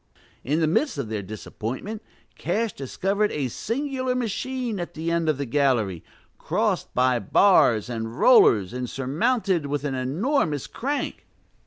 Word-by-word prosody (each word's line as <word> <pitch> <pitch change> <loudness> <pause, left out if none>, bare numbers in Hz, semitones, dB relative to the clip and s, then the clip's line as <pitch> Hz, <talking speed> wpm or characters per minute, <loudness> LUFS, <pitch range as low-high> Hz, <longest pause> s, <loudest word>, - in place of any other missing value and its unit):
In 150 +6 0
the - - +4
midst 230 - +1
of 130 -6 -3
their 110 -2 -2
disappointment, 115 - -6 0.3
Cash 215 +5 -1
discovered 195 +10 -1
a 140 -4 -2
singular 255 - -2
machine 245 -1 -2
at 175 - -6
the 165 +2 -2
end 170 -1 +1
of 155 - +1
the 140 - -2
gallery, 120 - +1 0.4
crossed - - -1
by 125 -1 +3
bars 115 - +4
and 115 0 -5
rollers 115 - +5
and 125 -1 -4
surmounted 170 - 0
with 145 0 -2
an 145 -2 -2
enormous 150 - 0
crank. 280 +4 -4
150 Hz, 145 wpm, -24 LUFS, -, 0.4 s, rollers